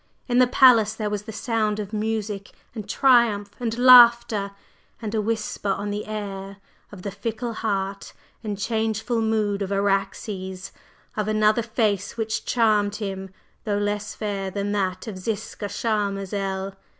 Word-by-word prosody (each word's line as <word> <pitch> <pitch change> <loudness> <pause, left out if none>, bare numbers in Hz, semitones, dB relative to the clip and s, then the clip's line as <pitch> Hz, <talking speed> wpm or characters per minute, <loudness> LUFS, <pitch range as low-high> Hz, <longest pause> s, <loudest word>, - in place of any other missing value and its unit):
in 245 -1 +2
the 255 - +6
palace 235 -4 +5
there 215 -2 -3
was 205 -1 -2
the - - -6
sound 215 -2 -1
of 210 0 -6
music 215 -2 -3 0.2
and 210 -3 -7
triumph 230 -6 +3
and 230 -2 -2
laughter, 235 -4 +7 0.5
and 220 -2 -5
a 220 - +1
whisper 215 -1 -2
on 205 +1 -1
the 205 +1 -4
air 200 -2 -6 0.3
of 195 -3 -11
the 200 - -4
fickle 230 +3 -4
heart 195 -3 -3 0.3
and 210 -2 -3
changeful 220 +2 -1
mood 215 -2 0
of 200 0 -3
Araxes; 195 -1 -2 0.4
of 215 -1 -1
another 215 +1 +3
face 215 -3 -1
which 220 -1 -2
charmed 210 -4 +2
him, 195 -2 -5 0.3
though 205 -2 -1
less 205 0 -2
fair 200 -3 -3
than 200 +1 -3
that 185 -2 -1
of 205 -5 -6
Ziska 210 +1 -4
Charmazel! 195 -3 -2
210 Hz, 150 wpm, -24 LUFS, 200-225 Hz, 0.5 s, laughter